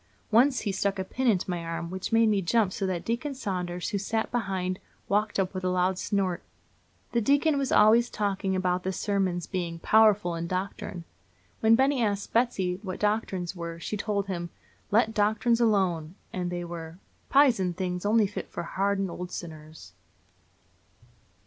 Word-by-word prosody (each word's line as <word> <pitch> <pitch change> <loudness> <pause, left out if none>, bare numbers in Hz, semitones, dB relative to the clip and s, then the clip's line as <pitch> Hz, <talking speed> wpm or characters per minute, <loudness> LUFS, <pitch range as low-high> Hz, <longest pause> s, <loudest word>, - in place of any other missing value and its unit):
Once 255 +4 +4
he 205 - -1
stuck 195 +1 -1
a 190 - -1
pin 255 +7 -2
into 195 -6 +2
my 175 -2 -3
arm, 165 +1 -4
which 190 +3 -4
made 225 0 +5
me 205 -2 +2
jump 195 +1 +2
so 195 - -2
that 180 -2 -3
Deacon 250 +5 -2
Saunders, 180 -7 -3
who 200 - -1
sat 220 +3 -2
behind, 190 -5 -2 0.3
waked 210 +1 +1
up 190 0 0
with 185 -1 -4
a 185 - +1
loud 180 +1 +1
snort. 190 -4 -1 0.7
The 235 - +1
deacon 285 +6 +3
was 270 -1 -1
always 225 +3 +5
talking 195 -2 -1
about 180 -1 0
the 190 - -2
sermons 190 -3 -1
being 175 -3 -3
"powerful 210 -1 +4
in 165 0 -3
doctrine." 185 -1 -4 0.6
When 225 +1 +5
Benny 265 +1 +2
asked 205 -2 -1
Betsy 190 -7 +1
what 190 -3 -5
doctrines 200 -4 -1
were, 170 -1 -6
she 210 - -4
told 205 -1 -1
him 175 -3 -4
to - - -26 0.4
"let 220 +1 +3
doctrines 220 +3 +2
alone;" 185 -7 +1 0.2
that 180 -1 -2
they 175 0 -4
were 165 -1 -7 0.3
"pizen 235 -11 +4
things, 180 -1 -3
only 215 +1 +4
fit 200 - -5
for 170 - -5
hardened 195 +1 -1
old 180 +1 -6
sinners." 155 - -9
195 Hz, 175 wpm, -27 LUFS, 180-220 Hz, 0.7 s, made